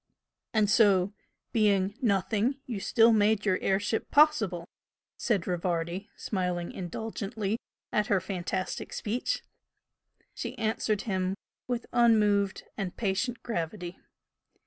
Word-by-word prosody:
"And 215 -2 +3
so 200 -3 +4 0.4
being 205 -3 +3
Nothing 210 +3 +1
you 230 -5 -4
still 225 +4 +5
made 210 0 +3
your 185 -2 +2
air 190 0 +2
ship 210 +2 -2
possible!" 220 - +3 0.5
said 205 -8 0
Rivardi, 175 +2 -2
smiling 180 -3 -2
indulgently 210 +3 -3 0.3
at 210 0 +1
her 200 - +3
fantastic 185 0 -3
speech. 225 +4 -2 0.9
She 255 - -5
answered 220 -2 0
him 190 -2 -1 0.3
with 245 -1 -2
unmoved 210 -4 +3
and 190 -3 -4
patient 230 +4 -1
gravity. 175 -3 -4
205 Hz, 110 wpm, -29 LUFS, 185-225 Hz, 0.9 s, still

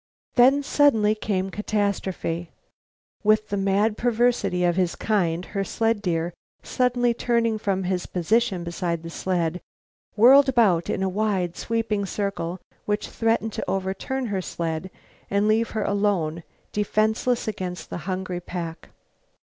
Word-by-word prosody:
Then, 270 +2 +5
suddenly 230 -8 +4
came 195 -3 -2
catastrophe. 195 -5 -2 0.7
With 215 0 +3
the 205 - -1
mad 200 +2 +1
perversity 240 -6 +1
of 175 -1 +2
his 180 -2 +1
kind, 180 -5 0
her 195 -1 0
sled 225 +2 0
deer, 170 -3 -1 0.3
suddenly 245 -1 +1
turning 230 -2 +1
from 195 -2 -1
his 180 0 -2
position 190 +1 +1
beside 170 -1 -3
the 165 - -7
sled, 175 -1 -1 0.5
whirled 265 +6 +7
about 205 -10 +3
in 190 - -1
a - - +1
wide, 190 -3 -1
sweeping 220 -3 -1
circle 190 -3 -3 0.3
which 210 0 -1
threatened 225 -1 0
to - - -4
overturn 195 +8 -2
her 190 - 0
sled 165 0 -4 0.4
and 200 +1 +2
leave 225 +2 +2
her 215 - +1
alone, 200 -6 0 0.3
defenseless 220 +4 0
against 185 -4 -5
the - - -3
hungry 185 -1 -3
pack. 170 -2 -6
200 Hz, 135 wpm, -24 LUFS, 180-225 Hz, 0.7 s, whirled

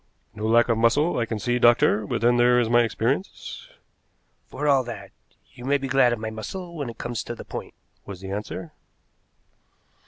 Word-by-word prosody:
"No 105 +1 -3
lack 115 +1 +4
of 115 -2 +1
muscle, 140 +8 +3
I 115 - -1
can 110 - -3
see, 120 +4 0
doctor, 115 -3 +4
but - - -2
then 120 +1 +4
there 125 0 +5
is 115 -1 0
my 120 0 +6
experience." 120 - -3 0.8
"For 150 +3 -4
all 135 -2 +4
that, 120 -1 -8 0.4
you 120 - -12
may 140 +2 +2
be 135 -1 -4
glad 130 -1 +4
of 120 - -1
my 110 0 -5
muscle 170 - -7
when 145 -6 -4
it 115 - -9
comes 120 -2 -4
to 120 - -6
the - - -10
point," - - -7 0.3
was 100 -3 -9
the 95 0 -7
answer. 105 +10 -5
120 Hz, 195 wpm, -24 LUFS, 110-135 Hz, 0.8 s, my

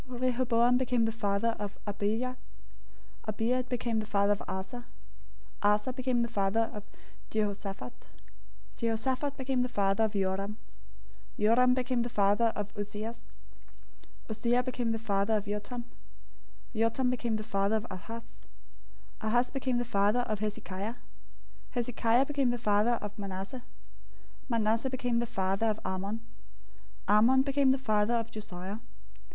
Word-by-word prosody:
Rehoboam 245 -1 +2
became 245 -3 +2
the 225 - +1
father 220 +1 0
of 205 -1 -4
Abijah. 215 +5 -1 0.9
Abijah 230 +4 0
became 235 -2 0
the 215 - -3
father 200 -1 +3
of 205 - -5
Asa. 240 +6 -5 0.7
001:008 205 - +5
Asa 210 +5 -1
became 255 -2 +1
the - - 0
father 225 0 +1
of 210 - -6 0.5
Jehoshaphat. 200 - -3 0.7
Jehoshaphat 260 +5 0
became 265 -1 0
the 250 - 0
father 200 -1 +2
of 215 - -2
Joram. 195 +1 -1 0.8
Joram 245 +4 +5
became 255 -1 0
the 240 - -1
father 210 +1 +3
of 205 -1 -4
Uzziah. 210 +2 -3
001:009 - - -17 1.1
Uzziah 240 +3 +2
became 245 -2 -1
the 225 - 0
father 210 -1 +1
of 205 - -4
Jotham. 210 +4 -4 0.9
Jotham 230 +3 +2
became 235 -2 -1
the 215 - -2
father 200 0 +1
of 220 0 -1
Ahaz. 225 +5 -8 0.8
Ahaz 240 +3 +2
became 260 -2 0
the 240 - 0
father 210 +1 +3
of 215 -4 -2
Hezekiah. 205 0 -3
001:010 - - -18 0.8
Hezekiah 240 +1 +3
became 275 -3 +1
the 245 - 0
father 215 +1 +3
of 210 +1 -6
Manasseh. 195 +5 -5 0.9
Manasseh 230 +2 +2
became 245 -2 0
the 240 - -1
father 195 +2 0
of 215 0 0
Amon. 195 +4 -2 0.9
Amon 235 +6 +6
became 275 0 +3
the 265 - +4
father 215 -2 +2
of 230 -1 -1
Josiah. 195 -1 -6
225 Hz, 140 wpm, -31 LUFS, 205-245 Hz, 1.1 s, Amon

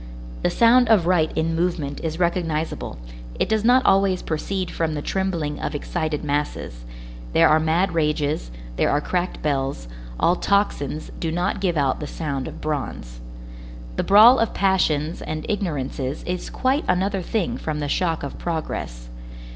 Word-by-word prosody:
The - - +2
sound 235 +1 +5
of 210 -7 +5
right 170 -3 +2
in 160 +1 +1
movement 165 -4 -1
is 160 -1 -2
recognizable, 165 - -1 0.4
it - - +2
does 220 -1 +1
not 250 +3 +4
always 195 -1 +3
proceed 180 +3 -3
from 160 -2 -1
the 145 - -3
trembling 170 -6 -2
of 150 - -3
excited 155 0 -2
masses; 145 - -3 0.5
there - - +6
are 155 +1 +5
mad 165 +4 +1
rages, 150 - 0 0.3
there - - +2
are 145 - +2
cracked 180 +4 -2
bells, 135 - -1 0.3
all 175 - +3
tocsins 180 -8 0
do 165 - -2
not 175 +3 -1
give 175 -4 0
out 135 -3 +1
the 150 - -5
sound 140 -4 -4
of - - -9
bronze. 95 - -4 0.7
The - - 0
brawl 220 +6 +7
of 225 - 0
passions 170 -5 +1
and 155 0 -4
ignorances 145 - -3
is 180 0 -4
quite 265 +3 0
another 190 +2 +1
thing 195 +1 -1
from 155 -1 -3
the 145 - -2
shock 165 +1 0
of 140 - -6
progress. - - -4
165 Hz, 160 wpm, -23 LUFS, 150-190 Hz, 0.7 s, brawl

